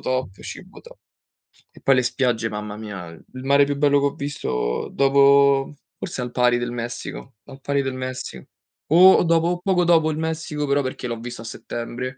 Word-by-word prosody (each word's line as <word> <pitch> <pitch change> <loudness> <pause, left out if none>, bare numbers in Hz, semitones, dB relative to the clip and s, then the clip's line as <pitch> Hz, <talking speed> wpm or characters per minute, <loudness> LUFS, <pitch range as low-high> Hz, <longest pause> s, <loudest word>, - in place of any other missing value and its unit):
top, 130 -7 -3
cibo - - -10
to - - -16 0.7
E - - -18
poi 135 - +4
le 125 - +2
spiagge, 120 -2 0
mamma 105 0 -6
mia, 105 -5 -7
il 130 +10 -12
mare 140 +1 +4
più 145 0 -2
bello 145 0 +3
che 140 - 0
ho 140 - 0
visto 60 - -3
dopo 140 0 +4 0.2
forse - - -5
al 125 0 -5
pari 125 -1 +2
del 120 0 -3
Messico, 120 +1 -6
al 135 - -12
pari 140 0 0
del 135 -1 -3
Messico. 130 0 -6 0.4
O 180 +5 +8
o - - +3
dopo 170 +1 +1
poco 185 -2 +2
dopo 165 -2 +3
il 150 - -4
Messico 160 -2 -3
però 140 +1 +2
perché 130 -1 -5
l'ho 115 -1 -4
visto 120 0 -8
a - - -9
settembre, 120 +3 -6
135 Hz, 190 wpm, -22 LUFS, 120-145 Hz, 0.7 s, O